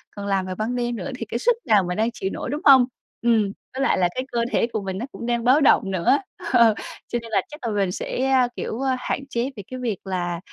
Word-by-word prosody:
còn 205 - -6
làm 195 -2 +1
vào 185 0 -4
ban 220 +5 -2
đêm 240 -1 -1
nữa 235 - -5
thì 230 - -5
cái 225 - -3
sức 485 - +3
nào 215 -6 +4
mà 180 0 -3
đang 220 +3 +1
chịu 190 - -3
nổi, - - -4
đúng 295 +4 -3
hông? 265 -3 +8 0.4
Ừm, 225 -4 +3 0.2
với 265 - -3
lại - - +2
là 180 -2 +3
cái 255 - -2
cơ 235 - 0
thể - - +2
của 215 - -1
mình 190 -1 -4
nó 230 - -3
cũng - - -7
đang 235 -1 0
báo 260 +5 +5
động 195 -8 +4
nữa, 185 +9 +3 0.4
ờ, 235 -3 +6 0.3
cho 240 - -2
nên 230 -1 -11
là 215 - +3
chắc 300 - -11
là - - -1
mình 195 -3 +1
sẽ, 255 +7 -2
a, 260 -2 +4
kiểu, 235 - -4
a, 265 -1 +1
hạn 275 +2 -3
chế 240 +1 -1
về 205 - -8
cái 255 - -7
việc 230 -6 -2
là, 175 -2 -2
235 Hz, 275 wpm, -23 LUFS, 195-255 Hz, 0.4 s, hông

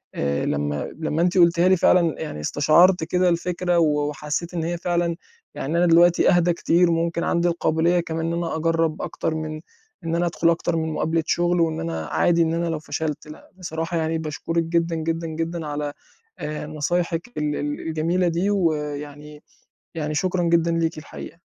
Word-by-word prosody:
آآ، 70 0 -1
لمّا 75 0 -2
لمّا 160 0 -1
أنتِ 180 +2 +1
قُلتِها 170 0 +5
لي 185 0 +5
فعلًا 170 -2 +3
يعني 155 - -5
استشعرت 160 - +4
كده 180 +2 +2
الفكرة، 175 0 0
و 150 -2 +2
وحسّيت 150 +4 -4
إن 170 -2 -2
هي 170 +1 -2
فعلًا 175 -1 0 0.4
يعني 155 +5 -2
أنا 175 - +4
دلوقتي 175 +1 +5
أهدى 175 -1 +3
كتير 170 +1 +2
ممكن 170 0 0
عندي 170 0 +1
القابلية 170 0 +1
كمان 165 -1 -3
إن 165 - -1
أنا 170 -1 -2
أجرّب 165 0 0
أكتر 160 - -3
من 155 0 -5 0.4
إن 165 0 -1
أنا 175 +1 +1
أدخل 170 0 +1
أكتر 170 0 0
من 160 -1 -1
مقابلة 160 +1 0
شغل 175 0 +2
وإن 160 -1 0
أنا 80 -1 -3
عادي 170 - +2
إن 165 -1 +2
أنا 170 +1 -1
لو 165 -2 -2
فشلت، 150 0 -4
لأ 155 - -13
بصراحة 165 -1 -3
يعني 160 0 0
باشكرك 160 +2 -2
جدًا، 165 0 0
جدًا، 165 +1 -2
جدًا 165 +1 -4
على 145 0 -3 0.5
آآ، 150 0 -5
نصايحِك 165 +3 -1
ال 150 -1 -1
ال 145 0 -3
الجميلة 170 +3 0
دي، 170 +4 0
ويعني 150 -5 -2 0.5
يعني 155 -2 -3
شكرًا 180 +3 0
جدًا 170 0 +2
ليكِ 165 -1 0
الحقيقة. 165 +3 -10
165 Hz, 180 wpm, -23 LUFS, 155-170 Hz, 0.5 s, قُلتِها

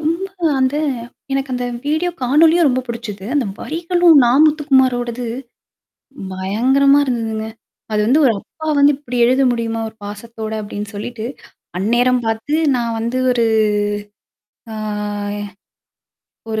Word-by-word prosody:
ரொம்ப 330 +5 -1 0.3
அந்த 260 +2 +1 0.6
எனக்கு 270 -1 -1
அந்த 245 0 -2 0.2
வீடியோ 315 +4 0
காணொலியும் 315 +6 +4
ரொம்ப 255 0 +1
புடிச்சுது. 230 -5 -6
அந்த 285 -3 +2 0.2
வரிகளும் 345 +1 +3
நா. 235 - +3 0.2
முத்துகுமாரோடது 260 -5 +1 1.1
பயங்கரமா 255 +10 +3
இருந்ததுங்க. 225 -3 -2 0.4
அது 210 - +1
வந்து, 270 +6 +4
ஒரு 250 - +5
அப்பா 315 +9 -10
வந்து 285 +1 +6
இப்டி 250 -4 -5
எழுத 255 +3 +3
முடியுமா, 230 -1 -2
ஒரு 220 - -23
பாசத்தோட 220 +1 -7
அப்டின்னு 205 0 -6
சொல்லிட்டு, 220 +2 -5 0.5
அந்நேரம் 245 +5 +2
பார்த்து 225 +6 -2 0.2
நான் 230 -1 -2
வந்து 235 +3 -2
ஒரு 235 -2 +2 1.3
ஆ - - -6 1.8
ஒரு 220 0 -1
245 Hz, 120 wpm, -18 LUFS, 225-285 Hz, 1.8 s, வந்து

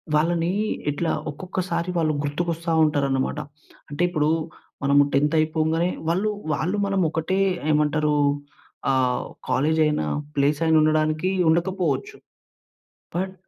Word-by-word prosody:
వాళ్ళని 170 +2 +1 0.4
ఎట్లా 160 +3 -1 0.2
ఒక్కొక్కసారి 180 +1 -3
వాళ్ళు 155 -2 +1
గుర్తుకొస్తా 165 +3 -2
ఉంటారన్నమాట. 140 -1 0 0.5
అంటే 145 +4 -1
ఇప్పుడు 155 -3 +1 0.5
మనం 140 +1 +3 0.2
10థ్ 150 +3 +2
అయిపోంగానే 160 +2 +1 0.2
వాళ్ళు 190 +6 +1 0.2
వాళ్ళు 180 +8 -1
మనం 195 -1 0
ఒకటే 160 +4 -1 0.3
ఏమంటారు, 150 0 +2 0.8
ఆహ్, 125 -2 +1 0.2
కాలేజయిన, 150 - +2 0.3
ప్లేసయినా 150 +3 +2
ఉండడానికి 155 +3 +1 0.2
ఉండకపోవచ్చు. 185 - 0 1.0
బట్, 190 +1 -2
155 Hz, 100 wpm, -23 LUFS, 150-175 Hz, 1.0 s, మనం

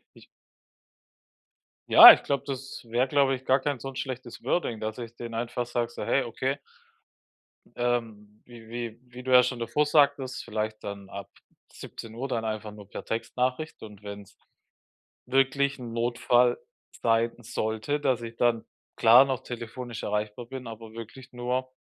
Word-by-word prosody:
Ich - - -17 1.6
Ja, - - +13
ich - - -3
glaube 140 -1 -1
das 135 -1 -6
wäre, 120 +3 +1
glaube 135 -1 +3
ich, 130 - -12
gar 130 +2 +4
kein 140 0 -2
so 135 +2 -7
schlechtes 130 -2 -6
Wording, 120 -11 -1
dass 110 0 -4
ich 120 -1 -8
denen 115 -1 -7
einfach 120 +1 -3
sage, 120 -1 -2
so: - - -6
„Hey, 140 - +2
okay“ 130 +4 -2 1.2
ähm, 110 -4 -2
wie 115 -2 -14
wie 120 -1 -5
wie 125 +1 -11
du 130 - -3
ja 125 0 +8
schon 125 -1 -2
davor 135 +6 +1
sagtest, 140 -3 +2
vielleicht 110 -1 -3
dann 100 -1 -7
ab 100 -1 -8 0.4
17:00 115 +4 -7
dann 115 -3 -2
einfach 110 -1 -4
nur 105 -2 -13
per - - -7
Textnachricht 125 +6 -3
und 105 -2 -11
wenn 100 0 -7
es 100 - -19 0.9
wirklich 135 +2 +2
'n 120 -2 -7
Notfall 120 +1 +2 0.4
sein 115 0 +3
sollte, 110 +4 -2
dass 130 -4 +1
ich 115 0 -8
dann, 115 -2 +1 0.3
klar, 120 +4 +8
noch 130 -2 -2
telefonisch 120 -1 -7
erreichbar 105 +3 -3
bin, 130 0 -8
aber 115 -1 -9
wirklich 115 +3 -10
nur 125 +1 -2
120 Hz, 160 wpm, -27 LUFS, 115-130 Hz, 1.6 s, Ja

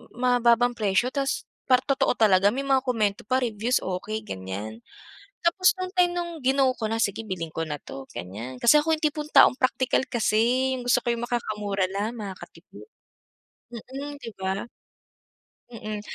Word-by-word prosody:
ma 245 0 +2
mababang 240 +1 +4
presyo. 220 +2 0
Tapos 275 0 -1 0.2
parang 255 -1 +4
totoo 275 -2 +1
talaga, 200 -3 +4
may 270 +3 -3
mga 270 -1 +3
komento 210 -4 0
pa, 255 +2 +1
reviews, 230 +2 0
okey," 205 +4 -4
ganiyan. 100 - -6 0.6
Tapos 370 +2 +3
nung 370 +1 -5
time 360 -1 +4
nung 345 -3 -5
gino 265 +1 +3
ko 220 -3 -3
na, 225 - -1
"sige 215 0 0
bilhin 175 -6 -5
ko 165 - -2
na 150 -2 -4
'to," 135 -1 -10
ganiyan, 110 +9 -7
kasi 295 - +5
ako 320 - -2
yung 310 - -6
tipong 300 0 -4
taong - - +7
praktikal 255 0 +1
kasi, 240 +3 +2
yung 255 - -5
gusto - - +5
ko 240 -1 -1
makakamura 210 -5 -2
lang, 220 +4 -3
makakatipid. 205 - -10 0.9
Mm, 275 +5 -7
'di 230 -5 -8
ba? 190 +2 -2 1.0
Mm. 215 -3 -6
235 Hz, 165 wpm, -25 LUFS, 200-265 Hz, 1.0 s, taong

